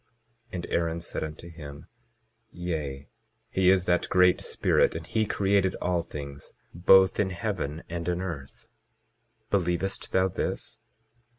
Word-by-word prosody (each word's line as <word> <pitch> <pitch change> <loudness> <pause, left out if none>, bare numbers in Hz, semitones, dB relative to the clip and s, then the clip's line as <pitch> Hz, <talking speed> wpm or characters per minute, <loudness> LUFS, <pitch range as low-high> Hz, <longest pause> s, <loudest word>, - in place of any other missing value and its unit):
22:10 - - -44 0.5
And 85 - -4
Aaron 85 0 0
said 85 - -4
unto 80 +2 -7
him: 75 -4 -10 0.6
Yea, 75 -6 -4 0.4
he 95 -1 +3
is 95 -1 +4
that 90 -1 +1
Great 90 0 +5
Spirit, - - +2
and 80 -1 -5
he 110 +4 0
created 100 -2 +2
all 90 -1 0
things 70 -3 -8 0.2
both 95 +2 +5
in 100 -2 +2
heaven 80 -3 -3
and 85 +1 -3
in 90 0 0
earth. 80 -8 -6 0.9
Believest 95 0 0
thou 95 0 +3
this? 95 - -3
85 Hz, 135 wpm, -27 LUFS, 80-95 Hz, 0.9 s, Great